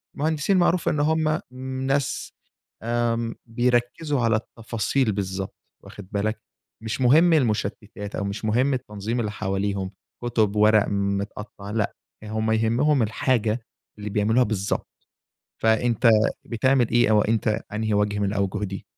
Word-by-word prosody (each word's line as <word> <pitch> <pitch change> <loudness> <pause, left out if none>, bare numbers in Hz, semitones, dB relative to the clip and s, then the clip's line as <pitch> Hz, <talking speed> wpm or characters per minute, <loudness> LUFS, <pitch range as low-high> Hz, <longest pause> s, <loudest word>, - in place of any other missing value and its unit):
المهندسين 155 +5 +1
معروف 175 0 +2
إن 150 - 0
هم 155 +1 +2 0.5
ناس، 135 -1 -1 0.5
آمم، 115 0 0
بيركزوا 120 +5 0
على 115 -1 +3
التفاصيل 115 +2 -1
بالضبط، 95 -1 -4 0.3
واخد 100 -3 -11
بالك، 110 +2 -1 0.4
مش 115 +4 -3
مهم 160 +7 +6
المشتتات 105 -5 -1
أو - - -2
مش 100 +2 -4
مهم 125 +6 +2
التنظيم 115 -2 -3
اللي 105 -3 -1
حواليهم، 95 -1 -2 0.3
كتب، 110 -4 +1
ورق 105 0 +5
متقطع، 100 +1 -3
لأ، 105 -1 -1 0.3
هم 110 +1 -1
يهمهم 115 +5 +2
الحاجة 115 0 0 0.3
اللي 105 - -5
بيعملوها 110 +4 +3
بالضبط، 105 -3 -2 0.7
فأنت 115 +1 +3 0.4
بتعمل 125 +1 +2
إيه، 120 -1 +3
أو 105 -1 +5
أنت 110 0 0
أنهي 110 0 -1
وجه 105 0 +1
من 100 - +1
الأوجه 100 0 -1
دي؟ 95 -1 -6
110 Hz, 130 wpm, -24 LUFS, 105-125 Hz, 0.7 s, مهم